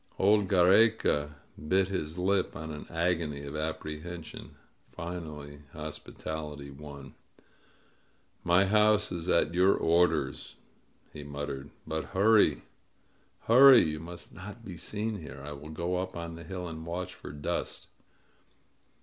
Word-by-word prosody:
Old 100 +1 +4
Giiereca 90 -5 +4 0.3
bit 95 +3 +3
his 85 -4 -3
lip 95 +1 +1
in 80 0 -6
an 75 - -8
agony 85 -4 -1
of 70 +2 -7
apprehension. 80 +2 -6 0.3
Finally 75 -4 -7
hospitality 75 -1 -6
won. 70 -1 -10 1.3
"My 90 +3 +4
house 105 0 +4
is 85 0 -4
at 85 -2 +3
your 95 +2 +4
orders," 80 -7 +1 0.6
he 75 - -8
muttered. 70 -1 -5 0.2
"But 80 0 -3
hurry! 110 +2 +5 0.8
Hurry! 130 +2 +8
You 75 -1 -2
must 85 +2 -9
not 100 +6 -10
be 90 - -7
seen 105 +4 -3
here! 70 -2 -9
I 75 - -6
will 75 +1 -9
go 85 +3 -2
up 90 -1 -4
on 85 0 -5
the 85 +1 -9
hill 90 +1 -5
and 80 -1 -7
watch 85 +2 -4
for - - -10
dust 75 0 -4
85 Hz, 130 wpm, -30 LUFS, 75-95 Hz, 1.3 s, Hurry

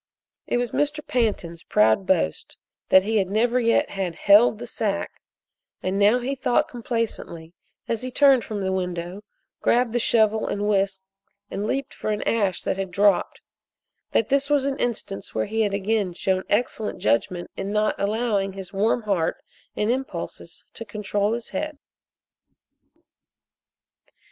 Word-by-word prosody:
It - - +1
was 245 -2 -1
Mr. 295 +1 -1
Pantin's 200 -9 -1
proud 110 - +3
boast 80 - 0 0.3
that 190 0 +7
he 215 0 +2
never 225 +6 +1
yet 230 -1 +2
had 190 -4 -3
"held 210 +5 +5
the 240 - -7
sack," 205 -4 -3 0.6
and 190 +2 -1
now 205 +4 +5
he 250 +2 -2
thought 260 -2 +1
complacently 230 -9 -4 0.3
as 230 -2 -1
he 255 - -4
turned 270 -2 +5
from 210 -2 -4
the 190 0 -1
window, 180 0 -3 0.4
grabbed 240 -1 +2
the 240 - +2
shovel 220 -2 +2
and 205 +1 -1
whisk 195 -2 +1 0.5
and 205 +2 -3
leaped 275 +2 -2
for - - -4
an 210 0 -1
ash 200 -5 0
that - - -1
had 195 -1 -3
dropped, 200 0 +2 0.7
that 225 - +1
this 280 +1 +2
was 290 -2 +3
an 275 -1 -2
instance 210 -5 -3
where - - +1
he 220 +2 -1
had 205 -2 +1
again 200 -2 0
shown 185 +1 -1
excellent 220 0 0
judgment 175 +10 0
in 195 +1 -4
not 215 0 +2
allowing 205 -2 0
his 195 0 -8
warm 220 +4 +1
heart 195 -6 0 0.4
and 210 +2 +1
impulses 265 +2 -5
to - - -7
control 205 0 -1
his 235 0 -4
head. 305 -1 -4
210 Hz, 155 wpm, -24 LUFS, 195-235 Hz, 0.7 s, that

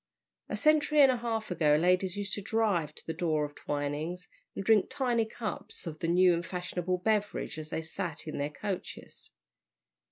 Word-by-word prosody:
A - - -2
century 305 -1 +4
and 270 -2 +8
a 250 - 0
half 225 -3 -3
ago 150 -4 +4
ladies 180 +4 +2
used 200 -1 -3
to 205 - -2
drive 195 -8 0
to - - -11
the 160 - -3
door 160 -3 0
of 145 - -9
Twining's 145 +6 -3 0.3
and 195 - -4
drink 220 -3 +5
tiny 240 -4 +1
cups 220 -4 -5
of 155 -2 -6
the 165 - -1
new 180 +1 +5
and 170 0 -1
fashionable 180 +1 -2
beverage 210 -4 -1
as 155 0 -7
they 160 - -3
sat 160 0 -4
in 155 - -4
their 145 +1 0
coaches. 190 +4 -6
180 Hz, 185 wpm, -30 LUFS, 160-215 Hz, 0.3 s, and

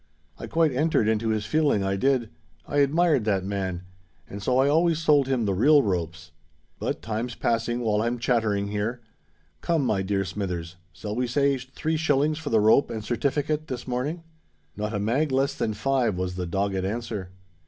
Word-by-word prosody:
I - - -6
quite 165 -2 +2
entered 145 -4 +2
into 110 0 +1
his 110 -1 -1
feeling, 150 -10 +2
I 95 0 0
did—I 115 - -2
admired 145 -1 +3
that 95 -3 0
man; 95 -3 -3 0.4
and 100 - -8
so 125 +5 +1
I 135 +1 +4
always 165 +2 +3
sold 150 -4 +3
him 130 -4 0
the 100 - +1
real 145 +9 +5
ropes. 90 -2 -3 0.5
But - - -3
time's 115 +2 -3
passing, 120 +1 -1
while 105 -2 +1
I'm 120 +2 -1
chattering 110 -5 0
here. 105 +4 -2 0.6
Come, 165 -5 +1
my 100 -5 +1
dear 95 0 -1
Smithers—shall 90 0 -6
we 125 +1 0
say 140 +3 +2
three 140 +5 -3
shillings 150 0 +1
for 160 - -5
the 110 - +3
rope 110 +6 +4
and 110 -2 -5
certifikit 145 +6 -1
this 125 -1 -6
morning?" 140 +7 -3 0.5
"Not 105 +1 -3
a - - -1
mag 130 +9 0
less 135 +1 +1
than 110 -2 -2
five," 120 -3 0
was 90 0 -2
the 90 -1 -4
dogged 95 +1 -1
answer. 105 -2 -4
115 Hz, 175 wpm, -25 LUFS, 100-140 Hz, 0.6 s, real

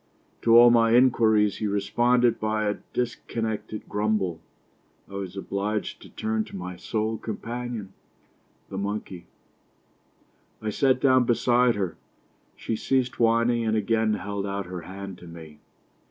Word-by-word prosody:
To 115 0 +6
all 120 0 +9
my 115 -1 +4
inquiries 110 -5 +4
he 110 - -2
responded 120 +4 +2
by 110 0 0
a 105 - -1
dis 120 -1 -1
connected 110 -1 -4
grumble. 105 -5 -1 0.7
I - - -15
was 100 -1 -5
obliged 100 +2 -3
to - - -13
turn 110 0 -2
to - - -11
my 90 -1 -6
sole 110 +4 -2
companion, 115 -2 -5 0.8
the 95 - -5
monkey. 100 -3 -5 1.3
I 110 -1 -3
sat 130 +3 +2
down 130 -2 +4
beside 120 0 +3
her; 95 -5 -3 0.6
she 115 - -3
ceased 130 +2 0
whining, 115 +1 +3
and 110 -1 +1
again 110 0 +1
held 100 0 -4
out 100 0 -3
her 90 0 -6
hand 95 +1 -8
to 90 - -12
me. 80 -3 -11
110 Hz, 140 wpm, -26 LUFS, 100-115 Hz, 1.3 s, all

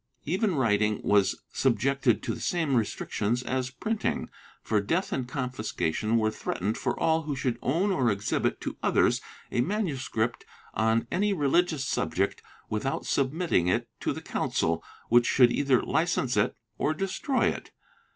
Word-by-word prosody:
Even 190 +4 +1
writing 105 -5 +2
was 100 -1 +2
subjected 130 0 +2
to - - -1
the - - -7
same 160 -6 0
restrictions 115 +1 -1
as 130 0 -1
printing, 215 - -2 0.3
for 105 -2 +1
death 170 - -1
and 130 -2 -2
confiscation 115 - -1
were 110 -1 +2
threatened 105 0 -2
for - - -2
all 160 0 +3
who 150 -2 -3
should 125 -3 -1
own 170 +10 +1
or 130 -10 +2
exhibit 100 0 0
to - - -4
others - - +3 0.3
a 120 - +2
MS. 170 - -1 0.6
on 110 +2 +2
any 205 +2 +2
religious 155 -2 +2
subject 95 -3 -1 0.3
without 110 +6 -2
submitting 140 - +1
it 90 - +1
to - - -1
the - - -6
Council, 80 0 -1 0.3
which 120 0 +5
should 125 -2 +5
either 135 -3 +2
license 155 -4 +1
it 105 +3 +2 0.2
or 155 - +1
destroy 195 - 0
it. - - -5
130 Hz, 150 wpm, -28 LUFS, 110-160 Hz, 0.6 s, which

